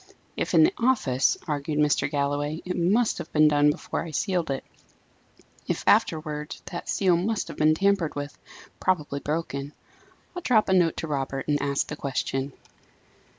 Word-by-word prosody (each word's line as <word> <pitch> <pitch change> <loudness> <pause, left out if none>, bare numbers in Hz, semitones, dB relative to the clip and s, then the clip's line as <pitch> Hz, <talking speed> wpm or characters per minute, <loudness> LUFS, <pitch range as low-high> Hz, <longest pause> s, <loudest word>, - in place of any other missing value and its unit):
"If - - -1
in - - +7
the 345 +4 +4
office," 220 - +2
argued 150 0 -2
Mr. 150 -1 +2
Galloway, 145 +2 -1
"it 180 - -3
must 210 +7 +2
have - - -7
been 155 0 +5
done 145 0 +4
before 150 - -3
I 170 - -7
sealed 175 0 -1
it; 135 -1 -3 1.0
if - - -2
afterwards, 150 -1 +1
that 175 - -6
seal 185 -3 +3
must 200 +5 -1
have - - -8
been 155 +1 +4
tampered 195 -3 +1
with, 145 0 -5 0.4
probably 150 -6 0
broken. 145 -2 -3 0.6
I'll 355 - -4
drop 225 - +3
a - - +3
note 175 -3 +3
to 165 - -3
Robert, 135 -2 -3
and 145 -1 +1
ask 140 -1 0
the 150 - -6
question." 135 -1 -3
155 Hz, 165 wpm, -26 LUFS, 145-180 Hz, 1.0 s, in